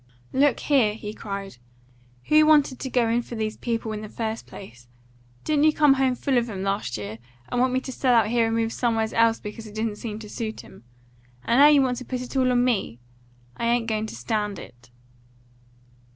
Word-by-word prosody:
"Look 275 -1 +2
here!" 245 -8 +2
he 210 -1 -7
cried. 200 - -7 0.7
"Who 305 0 +6
wanted 290 -4 +4
to 265 - -4
go 245 -2 +2
in 230 +1 +1
for 240 - -9
these 220 -1 -3
people 230 -2 -3
in 215 -1 -5
the 215 - -8
first 225 0 -4
place? 120 -10 -12 0.6
Didn't 300 -1 +2
you 310 - +6
come 295 -3 +5
home 265 -1 +1
full 260 0 +1
of 235 0 -4
'em 190 -3 -5
last 195 - -2
year, 105 +2 -7 0.3
and 245 - 0
want 255 0 +2
me 255 +1 0
to 260 - -7
sell 255 0 +2
out 220 -2 +3
here 230 -1 +2
and 225 - -1
move 225 0 0
somewheres 225 -2 0
else 230 0 +3
because 220 +1 -8
it 210 - -12
didn't 215 -1 -2
seem 215 -2 -6
to 220 -1 -9
suit 220 +1 -5
'em? - - -16 0.6
And 235 - +3
now 290 - +9
you 290 -2 +6
want 250 -1 -1
to 255 - -7
put 250 0 -4
it 250 +2 -8
all 255 -1 +3
on 245 0 +3
me! 200 - -1 0.6
I 235 - -2
ain't 235 0 +1
going 220 -1 -2
to - - -8
stand 210 - -2
it." 125 0 -13
230 Hz, 220 wpm, -24 LUFS, 210-255 Hz, 0.7 s, now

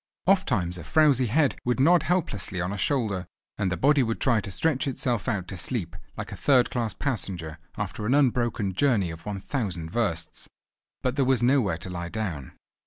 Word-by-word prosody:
Ofttimes 125 - +2
a - - -8
frowsy 130 - +3
head 140 +5 +2
would 125 +1 0
nod 170 +6 +5
helplessly 105 - -1
on 90 +3 -2
a - - -3
shoulder, 100 -5 0 0.3
and 95 -2 0
the 90 - -1
body 145 +1 +4
would 115 -2 -1
try 120 -5 +2
to 100 - -7
stretch 145 - 0
itself 125 -3 -1
out 95 -6 -2
to 95 - -6
sleep 85 -1 -3 0.2
like - - -5
a - - -5
third 130 -4 +3
class 115 -6 -2
passenger 90 - -3 0.2
after 105 - -3
an 130 - +3
unbroken 120 -7 +1
journey 100 -6 +2
of 80 +5 -10
one 100 -2 -3
thousand 95 - -3
versts, 85 -8 -2 0.5
but 125 +2 -1
there 140 - +3
was 130 -2 +2
nowhere 120 -9 +3
to 90 +2 -7
lie 85 -1 -4
down. 90 -12 -4
110 Hz, 190 wpm, -26 LUFS, 90-130 Hz, 0.5 s, nod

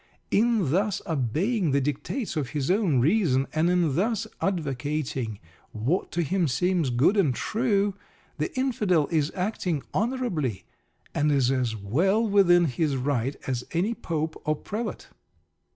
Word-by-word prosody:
In 215 - +2
thus 200 +3 +1
obeying 165 - 0
the 140 - +4
dictates 150 - -3
of 145 -5 -2
his 140 +4 0
own 185 - +2
reason, 145 - +2
and 160 +2 +2
in 175 -5 +2
thus 220 +4 0 0.2
advocating 145 - -2 0.4
what 125 - -1
to 170 - +1
him 180 +2 +1
seems 170 +3 +1
good 125 - +3
and 160 - +2
true, 205 -3 +1 0.5
the - - -1
Infidel 210 - +1
is 155 -2 +1
acting 180 -6 -2
honourably, 195 - -1 0.5
and 150 +1 +2
is 135 -3 +3
as 125 -4 0
well 175 - +1
within 180 -4 +5
his 145 0 0
right 130 0 -1
as 125 -2 -2
any 185 +7 +1
Pope 160 -8 -3
or 155 0 +1
Prelate. 215 +9 -5
165 Hz, 140 wpm, -26 LUFS, 135-200 Hz, 0.5 s, within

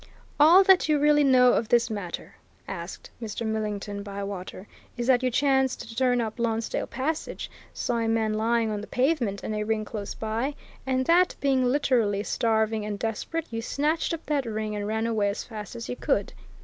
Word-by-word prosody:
"All 335 +6 +8
that 380 -4 +5
you 305 - +4
really 295 0 +4
know 255 -2 +6
of 225 - 0
this 235 -1 +3
matter," 200 -5 -5 0.3
asked - - -7
Mr. 225 +1 -4
Millington 210 -2 -3
Bywater, 200 -1 -6 0.3
"is 240 - -2
that 250 -1 +4
you 255 - +1
chanced 265 0 +2
to 225 - -10
turn 250 0 +2
up 220 +1 -4
Lonsdale 225 -1 -1
Passage, 300 +5 -3 0.2
saw 240 - -2
a 225 - 0
man 225 -1 +1
lying 225 +1 +1
on 210 -1 -3
the 210 - -8
pavement 250 -7 0
and 215 - -3
a 210 - -2
ring 215 0 -1
close 210 -2 -6
by, 230 +6 -2 0.3
and 260 0 +1
that, 355 +4 +4
being 265 -2 +2
literally 245 -6 +2
starving 220 -1 0
and 210 -1 -3
desperate, 230 +10 -3
you 225 0 -3
snatched 300 +7 0
up 330 -1 -4
that 285 -5 0
ring 215 -1 -3
and 205 0 -3
ran 220 +1 -1
away 215 -3 +1
as 200 - -4
fast 215 -1 -8
as 230 -1 -6
you - - -3
could?" - - -1
230 Hz, 190 wpm, -26 LUFS, 215-265 Hz, 0.3 s, All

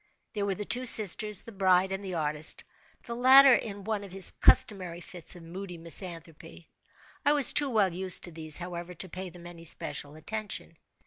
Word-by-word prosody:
There 205 -2 -2
were 195 - -1
the 210 - -5
two 250 +4 0
sisters, 210 -1 +1
the 230 - -11
bride, 190 -2 +2
and 195 +1 -4
the 185 -2 -5
artist—the 155 +8 -4
latter 260 +2 +7
in 205 -4 -2
one 215 0 -3
of 195 - -11
his 190 0 +1
customary 180 -5 +3
fits 175 0 -6
of 175 - -12
moody 180 +1 -8
misanthropy. 165 -1 -8 0.5
I 290 - +4
was 285 -4 +5
too 290 -2 +3
well 205 -7 +2
used 185 0 +1
to 175 - -3
these, 155 -2 -2
however, 175 0 -7
to 185 - -4
pay 185 +2 -6
them 175 0 -14
any 170 -1 -11
special 150 -2 -3
attention. 205 0 -5
185 Hz, 185 wpm, -29 LUFS, 170-210 Hz, 0.5 s, latter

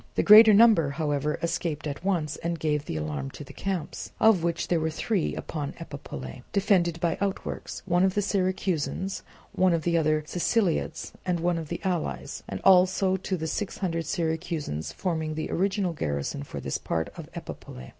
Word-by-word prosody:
The - - +2
greater 215 +1 +10
number, 210 -8 +6
however, 145 0 -1
escaped 165 -3 -2
at 145 +2 -5
once 170 -6 0
and 170 0 -2
gave 150 -2 -1
the 80 - -3
alarm 75 -3 -3
to - - -9
the - - -12
camps, 185 -6 -4
of 220 -5 +5
which 170 0 -1
there 170 - +2
were 160 0 0
three 190 +3 -1
upon 145 -3 -4
Epipolae, 140 -4 -8
defended 185 -4 +2
by 170 -2 0
outworks, 200 -1 -3
one 175 -1 +2
of 190 -1 +2
the 205 - +2
Syracusans, 190 -2 -1 0.3
one 185 -1 +3
of 165 -2 0
the 170 -1 +2
other 155 -1 +1
Siceliots, 180 +2 0
and 180 -2 0
one 170 0 +1
of 160 - -6
the - - -4
allies; 180 -5 -2
and - - -4
also 185 0 +5
to 190 0 -3
the 160 - -4
six 195 +5 -3
hundred 165 -4 -2
Syracusans 160 - -2
forming 160 -4 -2
the 155 - -3
original 190 -1 0
garrison 70 - -3
for - - -7
this - - -3
part 80 -2 -2
of - - -9
Epipolae. 65 0 -8
170 Hz, 180 wpm, -27 LUFS, 155-190 Hz, 0.3 s, greater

